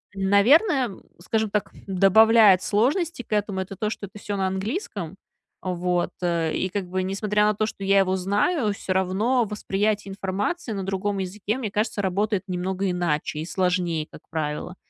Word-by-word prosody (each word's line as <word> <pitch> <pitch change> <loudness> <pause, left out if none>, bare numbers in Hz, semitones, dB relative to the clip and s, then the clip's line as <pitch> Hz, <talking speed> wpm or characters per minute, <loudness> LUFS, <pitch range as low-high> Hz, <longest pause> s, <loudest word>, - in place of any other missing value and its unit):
наверное, 240 - +4 0.3
скажем 220 +4 -1
так, 210 -1 -1 0.2
добавляет 195 +1 +6
сложностей 265 - +1
к - - -5
этому- 205 -2 0
это 190 +1 -7
то, 210 +3 -1
что 200 - -6
это 205 - -14
всё 205 0 -4
на 190 - +1
английском. 195 - -4 0.5
Вот. 180 -1 -1
Э. 170 -2 0
И, 190 - -1
как 185 -1 -3
бы, 185 +1 -1
несмотря 210 +2 0
на 210 - +3
то, 215 +1 0
что 210 -2 -6
я 195 0 +4
его 190 -1 +2
знаю, 210 - +1
всё 190 - -3
равно 195 +7 +1
восприятие 210 0 -1
информации 200 - -3
на 200 -2 -3
другом 195 +1 -2
языке, 200 +4 -3
мне 240 -5 -3
кажется, 210 0 -1
работает 200 +1 0
немного 185 +1 -2
иначе 170 -4 -1
и 155 - -3
сложнее, 180 -4 0
как - - -13
правило. 155 +2 -3
195 Hz, 170 wpm, -24 LUFS, 185-215 Hz, 0.5 s, добавляет